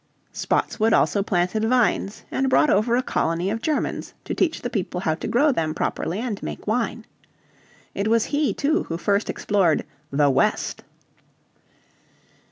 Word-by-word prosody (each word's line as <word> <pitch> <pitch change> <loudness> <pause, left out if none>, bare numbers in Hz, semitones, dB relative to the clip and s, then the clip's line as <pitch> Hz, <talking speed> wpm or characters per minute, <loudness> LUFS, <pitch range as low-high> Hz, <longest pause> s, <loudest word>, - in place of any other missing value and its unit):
Spotswood 220 0 0
also 200 - +3
planted 185 +2 0
vines, 225 -3 +1
and 265 0 0
brought 295 - +4
over 220 +4 +3
a 255 - +1
colony 170 0 0
of 225 +1 -3
Germans 310 +2 -2
to - - -3
teach 325 -3 0
the 245 - -2
people 180 -3 -2
how 160 -4 +1
to 155 - -5
grow 285 +5 +3
them 160 - -1
properly, 175 - -2
and 220 -3 -3
make - - -6
wine. 225 0 -1 0.9
It 200 - -2
was 230 0 +3
he, 290 -1 +2
too, 310 +5 0
who 165 - -4
first 200 +4 0
explored 190 -6 +1 0.3
"the 140 0 +3
West." - - 0
215 Hz, 155 wpm, -23 LUFS, 180-245 Hz, 0.9 s, brought